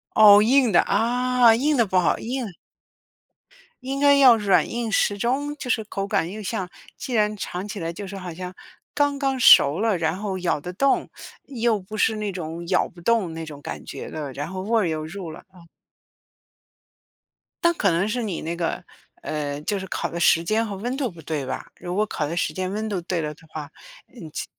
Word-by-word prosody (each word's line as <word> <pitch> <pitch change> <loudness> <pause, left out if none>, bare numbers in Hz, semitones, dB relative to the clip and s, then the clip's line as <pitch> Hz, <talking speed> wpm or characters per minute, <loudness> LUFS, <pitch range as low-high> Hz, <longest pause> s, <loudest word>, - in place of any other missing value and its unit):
哦， 205 -1 +9
硬 250 +2 +4
的， 175 -4 +5
啊， 245 +2 +3
硬 290 +4 +1
的 235 - +4
不 185 -1 +1
好， 175 - +2
硬 240 -5 -4 1.3
应 270 +2 -3
该 285 0 +6
要 260 -4 +7
软 195 -6 +2
硬 235 -1 -3
适 205 -1 +1
中， 275 +6 -1
就 260 - -7
是 220 -1 +1
口 195 -1 -4
感 170 -3 0
又 215 +2 -7
像 190 -2 -3 0.3
既 255 - -6
然 210 -1 +2
尝 185 -1 -5
起 210 - -6
来 165 0 -3
就 195 +3 -7
是 200 - -7
好 180 -2 -6
像 180 +2 -7 0.4
刚 285 -1 +1
刚 270 -1 0
熟 145 - +7
了， 220 -3 +2
然 160 +1 0
后 200 -2 -3
咬 175 -4 0
得 180 +4 -6
动， 275 +9 +1 0.4
又 235 -4 0
不 205 +4 -8
是 220 +1 +2
那 210 -1 -2
种 170 -1 -6
咬 180 - +2
不 175 - -16
动 225 -1 +2
的 165 - -8
那 - - -4
种 150 -3 -10
感 - - -7
觉 - - -7
了， 145 -3 -6
然 145 +3 -5
后 185 +1 -5
味 225 +2 +2
儿 180 - 0
又 155 -1 -3
入 170 +1 -7
了 155 - -11
嗯。 175 -2 -16 2.0
但 340 - +5
可 210 - +1
能 175 +4 +1
是 240 +3 -2
你 200 -7 -4
那 165 +2 -3
个， 170 -1 -3 0.4
呃， 145 -2 -3
就 205 +5 -1
是 190 - -6
烤 - - -3
的 170 - -5
时 170 -1 +4
间 220 +5 +1
和 200 - -5
温 240 +6 -3
度 265 -5 -1
不 170 -3 -13
对 150 -3 -3
吧？ - - -5
如 175 0 -5
果 210 +3 +2
烤 160 -8 -3
的 165 +3 -4
时 175 - 0
间、 185 0 -3
温 215 +2 -3
度 195 -3 -1
对 170 -1 -2
了 150 -1 -3
的 160 - -20
话， 155 -1 -7 0.6
嗯， 155 - -10
其 - - -4
195 Hz, 235 characters per minute, -23 LUFS, 170-230 Hz, 2.0 s, 哦